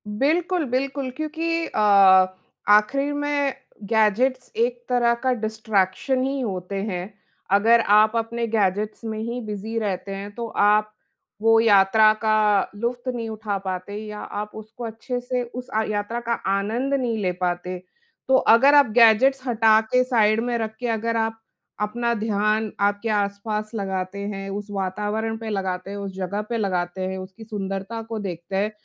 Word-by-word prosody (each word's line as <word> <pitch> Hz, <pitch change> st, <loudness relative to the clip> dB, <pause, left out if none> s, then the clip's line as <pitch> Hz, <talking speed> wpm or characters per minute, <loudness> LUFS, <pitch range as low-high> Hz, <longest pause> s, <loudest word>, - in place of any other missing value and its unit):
बिल्कुल, 325 Hz, -, 0 dB
बिल्कुल, 270 Hz, +1 st, -2 dB
क्योंकि 330 Hz, +2 st, -2 dB
अ, -, -, -4 dB, 0.9 s
आखिर 275 Hz, +8 st, +3 dB
में 290 Hz, -1 st, 0 dB, 0.3 s
गैजेट्स 230 Hz, +5 st, +1 dB
एक 240 Hz, +1 st, 0 dB
तरह 240 Hz, -1 st, +3 dB
का 260 Hz, -, +2 dB
डिस्ट्रैक्शन 220 Hz, +2 st, 0 dB
ही 270 Hz, +1 st, -1 dB
होते 190 Hz, -4 st, -4 dB
हैं। 190 Hz, -1 st, -4 dB, 0.4 s
अगर 225 Hz, +4 st, +5 dB
आप 215 Hz, +1 st, +4 dB
अपने 230 Hz, +1 st, -1 dB
गैजेट्स 210 Hz, 0 st, -1 dB
में 220 Hz, -1 st, -4 dB
ही 235 Hz, +3 st, -3 dB
बिज़ी 215 Hz, +2 st, -5 dB
रहते 195 Hz, -2 st, -3 dB
हैं 200 Hz, +1 st, -7 dB
तो 235 Hz, -1 st, -4 dB
आप 210 Hz, 0 st, +2 dB, 0.5 s
वो 225 Hz, 0 st, +5 dB
यात्रा 215 Hz, 0 st, +5 dB
का 215 Hz, -2 st, +3 dB
लुत्फ़ 240 Hz, +4 st, -3 dB
नहीं 230 Hz, -1 st, -4 dB
उठा 215 Hz, -2 st, -3 dB
पाते 190 Hz, +1 st, -5 dB
या 210 Hz, 0 st, -7 dB
आप 210 Hz, +1 st, -5 dB
उसको 220 Hz, +2 st, -10 dB
अच्छे 230 Hz, +2 st, -4 dB
से 250 Hz, 0 st, -2 dB
उस 245 Hz, +1 st, -8 dB
अ, 220 Hz, -, +3 dB
यात्रा 210 Hz, +3 st, -2 dB
का 235 Hz, 0 st, -2 dB, 0.2 s
आनंद 230 Hz, +8 st, -1 dB
नहीं 245 Hz, -5 st, 0 dB
ले 185 Hz, -2 st, +1 dB
पाते। 180 Hz, 0 st, -2 dB, 0.5 s
तो 265 Hz, -, +4 dB, 0.2 s
अगर 275 Hz, +5 st, +5 dB
आप 285 Hz, -5 st, +6 dB
गैजेट्स 255 Hz, +4 st, +5 dB
हटा 220 Hz, -2 st, +4 dB
के 255 Hz, 0 st, +5 dB
साइड 220 Hz, -4 st, +2 dB
में 240 Hz, -1 st, -1 dB
रख 220 Hz, -1 st, -4 dB
के 245 Hz, -, -3 dB
अगर 230 Hz, +1 st, -1 dB
आप 225 Hz, 0 st, -1 dB, 0.4 s
अपना 235 Hz, +3 st, 0 dB
ध्यान 215 Hz, 0 st, 0 dB
आपके 205 Hz, +2 st, 0 dB
आस-पास 210 Hz, +1 st, -2 dB
लगाते 190 Hz, -1 st, -3 dB
हैं, 200 Hz, -1 st, -5 dB
उस 205 Hz, +1 st, -5 dB
वातावरण 210 Hz, +3 st, -2 dB
पे 225 Hz, 0 st, -6 dB
लगाते 190 Hz, -2 st, -3 dB
हैं, 200 Hz, -, -5 dB
उस 200 Hz, -1 st, -5 dB
जगह 190 Hz, +2 st, -3 dB
पे 235 Hz, -, -1 dB
लगाते 185 Hz, -3 st, -2 dB
हैं, 190 Hz, 0 st, -3 dB
उसकी 190 Hz, +4 st, -9 dB
सुंदरता 200 Hz, 0 st, -5 dB
को 225 Hz, 0 st, -6 dB
देखते 180 Hz, -2 st, -6 dB
हैं 205 Hz, +2 st, 0 dB
220 Hz, 160 wpm, -23 LUFS, 200-240 Hz, 0.9 s, आप